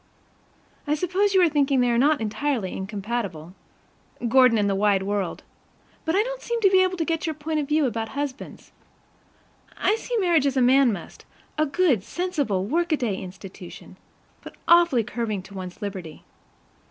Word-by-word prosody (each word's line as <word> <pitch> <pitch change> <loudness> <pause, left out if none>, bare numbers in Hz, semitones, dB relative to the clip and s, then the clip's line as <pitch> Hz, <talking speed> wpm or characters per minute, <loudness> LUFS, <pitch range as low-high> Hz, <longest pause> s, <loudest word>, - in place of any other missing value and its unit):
I 295 - +2
suppose 370 +5 0
you 375 - +6
are - - +6
thinking 285 -3 +2
they 245 -1 +3
are 235 - +1
not 290 +1 +3
entirely 225 -1 -2
incompatible 195 -4 -4 0.7
Gordon 255 -1 +5
and 205 -1 +1
the 200 - +1
wide 195 -1 +2
world 200 -2 -3 0.6
but 320 +1 0
I 410 - +4
don't - - -6
seem 470 - -2 0.2
able 370 -1 +3
to 325 - -1
get 330 0 -2
your 315 - -2
point 305 +1 -2
of 290 - -3
view 300 0 +2
about 225 -2 -2
husbands. 285 -1 -6 1.1
I 420 - +2
see 480 +1 -3
marriage 340 -8 +3
as 270 -1 -1
a - - +4
man 260 0 +5
must, 200 - -8 0.3
a 310 0 +1
good, 280 - +2
sensible 285 - -2
workaday 295 - 0
institution; 190 -1 -10 0.5
but - - -11
awfully 340 -8 +5
curbing 215 -3 -3
to 200 - -14
one's 185 +2 -8
liberty. 185 -6 -7
265 Hz, 165 wpm, -24 LUFS, 205-320 Hz, 1.1 s, you